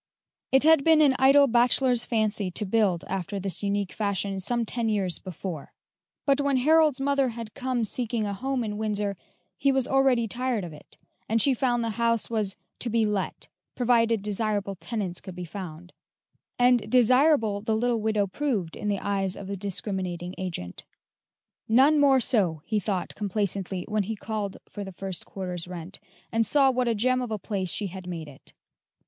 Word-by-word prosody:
It 265 +1 +4
had 320 -2 +6
been 320 0 +5
an 280 -3 +5
idle 275 +2 +7
bachelor's 245 0 +3
fancy 215 -4 0
to 195 +4 -1
build 195 -4 +1
after 195 +1 -3
this 195 -1 -2
unique 200 -2 -1
fashion 200 -2 -2
some 235 +5 0
ten 230 0 -2
years 190 -6 0
before; 180 -4 -7 0.5
but 280 0 +3
when 280 -2 +2
Harold's 305 +1 +4
mother 275 -1 +1
had 230 -2 -7
come 255 -3 -1
seeking 230 0 -2
a 200 - -2
home 260 +4 -2
in 210 -1 -4
Windsor, 210 -2 -1 0.4
he 275 - +3
was 265 -2 +1
already 265 -4 +3
tired 245 -1 -2
of 170 -3 -7
it, 150 - -16 0.3
and 225 +1 +2
she 270 +4 +4
found 240 -1 0
the 230 - -1
house 230 -1 +1
was 210 -4 -1 0.2
"To 240 - -3
be 230 -1 +2
let," 205 -3 -2 0.3
provided 230 -3 +2
desirable 205 -1 -1
tenants 195 -2 -4
could 185 - -9
be 180 0 -6
found; 175 -1 -8 0.6
and 245 -3 +3
"desirable" 250 -3 +4
the 220 +1 0
little 235 -1 0
widow 215 -2 +1
proved 200 - -2
in - - -5
the 205 -1 +1
eyes 195 -1 -1
of 200 - -7
the 200 +1 -4
discriminating 185 -2 -3
agent. 170 - -5 0.8
"None 270 +7 +5
more 275 -2 +5
so," 185 - +1
he 215 -2 0
thought 190 -2 -3
complacently 195 -2 -2
when 215 -1 0
he 215 +3 -3
called 210 -2 -4
for 205 - -7
the 195 -1 -8
first 190 0 -5
quarter's 180 -3 -5
rent, 180 +1 -8 0.3
and 225 0 +2
saw 270 +5 +4
what 250 -1 0
a 230 - +1
gem 255 +4 +1
of 250 - -4
a 215 - -2
place 195 -3 -3
she 205 +6 0
had 185 -1 -7
made 165 -3 -5
it. 140 -2 -11
215 Hz, 180 wpm, -26 LUFS, 195-245 Hz, 0.8 s, idle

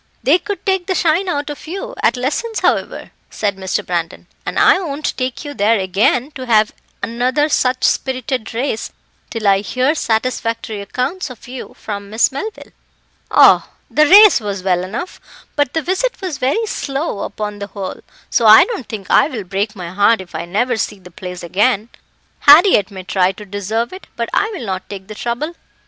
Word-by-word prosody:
"They 290 +9 +4
could 410 +2 -6
take 380 -3 0
the 375 - 0
shine 350 +3 +2
out 290 -3 -2
of 295 - -10
you 375 +4 -5
at - - +2
lessons, 365 - -2
however," - - -1 0.2
said 205 -2 -2
Mr. 190 -1 -2
Brandon, 170 -1 -3 0.2
"and - - -3
I - - +5
won't 305 -5 -3
take 255 +3 -3
you 290 - -5
there 220 -1 +2
again 205 +8 +1
to 260 -3 -8
have 215 -2 +3 0.3
another 255 +6 +1
such 255 -3 +1
spirited 255 -3 -1
race 240 -2 -2 0.4
till 225 -3 -3
I 195 -1 +5
hear 255 +7 0
satisfactory 230 -5 -2
accounts 270 - -3
of 245 -2 -12
you 255 0 -8
from 200 -1 -6
Miss 220 +5 +2
Melville." 410 +11 -6 0.6
"Oh! - - +6 0.2
the 305 0 +4
race 410 +1 +8
was 200 -4 -4
well 180 -2 +1
enough, 225 - -6 0.3
but 290 -2 0
the 320 - 0
visit 385 +8 -1
was 360 -8 -4
very 285 - +1
slow 275 - -3
upon 210 0 -5
the 200 - -5
whole, 195 -2 -6 0.3
so - - +2
I - - +9
don't 430 - -6
think 205 -4 -6
I - - +5
will 245 -9 -5
break 200 +4 -2
my 175 -3 -7
heart 205 +4 +3
if 185 -2 -11
I - - -4
never 225 +7 0
see 210 -1 -2
the 180 -1 -15
place 180 +1 -8
again. 210 +5 +1 0.5
Harriett 295 - +6
may 190 -2 -9
try 185 0 +1
to 210 +2 -11
deserve 205 - -3
it, 375 - -10
but 235 -1 -3
I 430 - +2
will 285 - -6
not 190 -2 -4
take 195 -2 -7
the - - -6
trouble." 240 +9 -3
235 Hz, 190 wpm, -17 LUFS, 200-295 Hz, 0.6 s, I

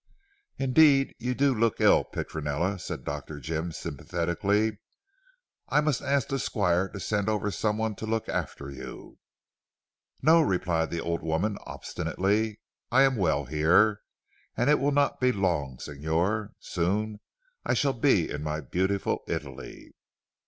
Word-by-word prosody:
"Indeed 135 +1 +4
you 125 +1 -2
do 140 +1 +3
look 115 -1 +1
ill - - +5
Petronella," 80 +6 -3
said - - -6
Dr. 75 +1 -5
Jim 80 +3 -3
sympathetically. 95 +9 -1 0.9
"I - - +4
must 150 -3 +1
ask 140 -3 +1
the 135 - -1
Squire 95 -5 +1
to 100 - -8
send 105 +1 -1
over 105 -1 0
someone 110 +3 -1
to 110 - -5
look 110 0 -1
after 70 0 -4
you." 70 - -10 1.0
"No," 160 +4 +6
replied 90 - 0
the 85 - -3
old 85 0 -2
woman 85 +6 0
obstinately, 105 +3 -1 0.3
"I 130 +2 +6
am 135 -1 +3
well 80 - +1
here. 85 - +3 0.6
And 125 +5 +3
it 150 - +4
will 140 - +2
not 145 0 +2
be 125 0 +3
for 105 - -6
long 75 -9 0
signor. 80 +10 -2
Soon 105 +4 -1 0.6
shall 140 -2 +2
I - - -15
be 110 - +3
in 75 - -4
my 75 0 -2
beautiful 95 +7 -1
Italy." - - -6
100 Hz, 145 wpm, -27 LUFS, 80-115 Hz, 1.0 s, No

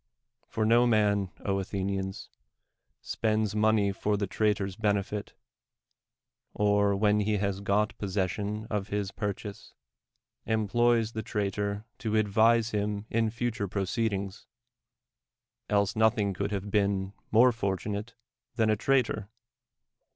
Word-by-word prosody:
For 110 - -1
no 120 +2 +5
man, 105 -4 +2
Athenians, 95 0 -3 0.7
spends 110 -2 0
money 105 -1 +3
for 105 +1 -1
the 100 - 0
trait(n'"s 100 -1 0
benefit, 105 -1 -1 1.2
or, 100 -1 +3
when 105 +1 +3
he 105 0 +1
has 100 -1 -1
got 105 +1 +1
possession 100 +2 -2
of 105 -1 -2
liis 100 -2 -3
purchase, 105 0 -5 0.7
emplo}'s 115 +1 +2
the 110 - -3
traitor 100 0 -2
to 110 -1 -1
advise 110 +2 +3
him 105 0 -2
in 115 0 +2
future 115 -2 -2
proceedings; 100 0 -2 1.2
else 100 -1 +2
nothing 110 -2 +2
could 100 +2 -2
have 100 0 -3
been 100 -2 +1 0.2
more 120 +3 +6
fortunate 105 +1 -3 0.4
than 110 -2 +2
a - - +3
traitor. 110 -3 +1
105 Hz, 115 wpm, -29 LUFS, 100-110 Hz, 1.2 s, more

